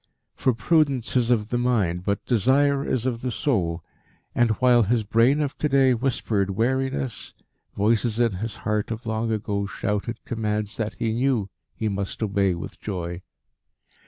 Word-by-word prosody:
For 130 - +1
prudence 140 -3 +1
is 120 -2 +2
of 110 -3 +1
the 120 - 0
mind, 100 -8 +1
but 100 +1 -1
desire 135 +5 +3
is 125 -1 -1
of 120 -3 -1
the 130 - -2
soul, 90 - -1 0.5
and 120 -1 +3
while 125 +1 +4
his 115 +1 +1
brain 115 +7 +3
of 145 -2 -2
to 150 - +1
day 135 -2 +4
whispered 115 -5 0
wariness, 130 +5 -1 0.4
voices 110 +2 +1
in 120 -2 +3
his 110 +2 -4
heart 105 0 0
of 115 +1 -5
long 110 0 -1
ago 100 -2 -1
shouted 105 +4 -2
commands 105 -2 -2
that 110 -1 -3
he 115 -2 -1
knew 120 -5 0 0.2
he 110 - -2
must 100 +1 -3
obey 100 -3 +1
with 85 - -8
joy. 90 -3 -4
115 Hz, 160 wpm, -24 LUFS, 105-125 Hz, 0.5 s, while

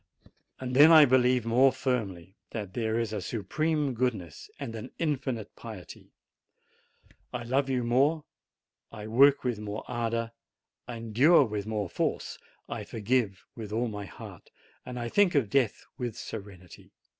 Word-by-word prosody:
Then 130 +5 +6
I 155 -2 +9
believe 125 -2 +3
more 125 +4 +5
firmly 105 -9 -3
that 105 -5 -6
there 110 -1 -1
is 115 -2 -2
a 105 - -2
Supreme 145 - -1
goodness 110 -10 -3
and 115 - -5
an 115 +3 -7
Infinite 130 -9 -2
pity; 110 -6 -10 1.2
I - - -4
love 135 +3 0
you 125 -2 0
more, 140 +7 +2 0.7
I 105 -2 -8
work 135 +6 +5
with 120 -4 -1
more 105 0 -5
ardor, 115 -1 -2 0.6
I 120 - -5
endure 125 +9 +5
with 105 -2 -4
more 105 -3 -2
force, - - -2 0.3
I - - -5
forgive 110 -3 -1
with 110 -3 -7
all 115 +2 0
my 105 -1 -6
heart, - - -12 0.4
and 125 0 -6
I 120 - -3
think 190 +5 +3
of 120 -8 +2
death 125 -5 +1
with 120 -3 -4
serenity. 95 -5 -10
120 Hz, 145 wpm, -28 LUFS, 105-130 Hz, 1.2 s, I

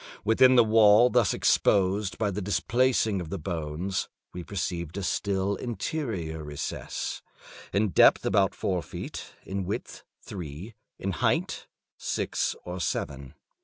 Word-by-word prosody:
Within 130 +4 +6
the 120 - +7
wall 110 +2 +6
thus 120 -4 +3
exposed 100 +1 +2
by 105 -2 0
the 100 +2 -3
displacing 110 0 +1
of 85 - -7
the 100 - -3
bones, 85 +2 -3 0.2
we 90 - -6
perceived 85 -2 -4
a 100 - -3
still 100 +1 0
interior 105 - -4
recess, 75 -1 -5 0.5
in 105 +1 +2
depth - - +5
about 95 -1 +2
four 90 -2 -1
feet, - - -8
in 95 0 -3
width 95 +3 -5 0.2
three, 90 +3 -8 0.2
in 95 - -3
height 85 - -1 0.3
six - - -1
or 90 +1 -5
seven. 70 -4 -3
95 Hz, 130 wpm, -27 LUFS, 85-105 Hz, 0.5 s, the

